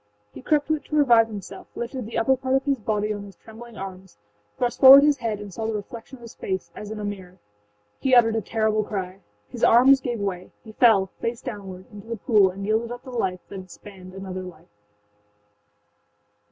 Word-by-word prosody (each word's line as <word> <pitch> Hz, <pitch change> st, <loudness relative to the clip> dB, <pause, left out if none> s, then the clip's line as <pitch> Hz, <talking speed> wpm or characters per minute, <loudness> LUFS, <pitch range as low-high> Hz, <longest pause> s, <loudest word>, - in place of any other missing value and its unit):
He 130 Hz, -, -10 dB
crept 295 Hz, -, +1 dB
to 315 Hz, -, 0 dB
it -, -, -17 dB
to 305 Hz, -, -4 dB
revive 240 Hz, -6 st, +5 dB
himself, 200 Hz, -3 st, -9 dB
lifted 235 Hz, -1 st, -5 dB
the 230 Hz, -, -5 dB
upper 230 Hz, +4 st, +3 dB
part 260 Hz, 0 st, -1 dB
of 270 Hz, -, +1 dB
his 275 Hz, -3 st, 0 dB
body 210 Hz, 0 st, -1 dB
on 205 Hz, -, -6 dB
his 200 Hz, -2 st, -12 dB
trembling 225 Hz, +2 st, -13 dB
arms, 190 Hz, -, -9 dB, 0.4 s
thrust 245 Hz, -1 st, -2 dB
forward 275 Hz, +1 st, +10 dB
his 295 Hz, -1 st, +3 dB
head 225 Hz, -4 st, -3 dB
and 205 Hz, -2 st, -9 dB
saw 220 Hz, +3 st, -4 dB
the 225 Hz, -, -2 dB
reflection 225 Hz, +5 st, -8 dB
of 240 Hz, -, -17 dB
his 230 Hz, -, -11 dB
face, 190 Hz, -1 st, -5 dB
as 210 Hz, -, -8 dB
in 215 Hz, 0 st, -6 dB
a -, -, -5 dB
mirror. 190 Hz, -3 st, -7 dB, 0.6 s
He 260 Hz, -1 st, +3 dB
uttered 225 Hz, -2 st, +5 dB
a 225 Hz, -, 0 dB
terrible 215 Hz, +1 st, 0 dB
cry. 190 Hz, -2 st, -5 dB, 0.3 s
His 240 Hz, -, -8 dB
arms 265 Hz, +3 st, +6 dB
gave 240 Hz, -3 st, -3 dB
way; 185 Hz, -3 st, -4 dB
he 220 Hz, -, -11 dB
fell, 215 Hz, -5 st, +4 dB
face 230 Hz, 0 st, -3 dB
downward, 195 Hz, -6 st, -8 dB
into 205 Hz, +1 st, -11 dB
the 230 Hz, 0 st, -4 dB
pool 210 Hz, -6 st, +3 dB
and 195 Hz, +2 st, -7 dB
yielded 220 Hz, +3 st, 0 dB
up 245 Hz, 0 st, -8 dB
the 260 Hz, -, -10 dB
life 185 Hz, -7 st, -2 dB
that 195 Hz, -, -7 dB
had 185 Hz, 0 st, -12 dB
spanned 185 Hz, -1 st, -13 dB
another 190 Hz, -1 st, -6 dB
life. 180 Hz, -, -12 dB
220 Hz, 215 wpm, -24 LUFS, 195-240 Hz, 0.6 s, forward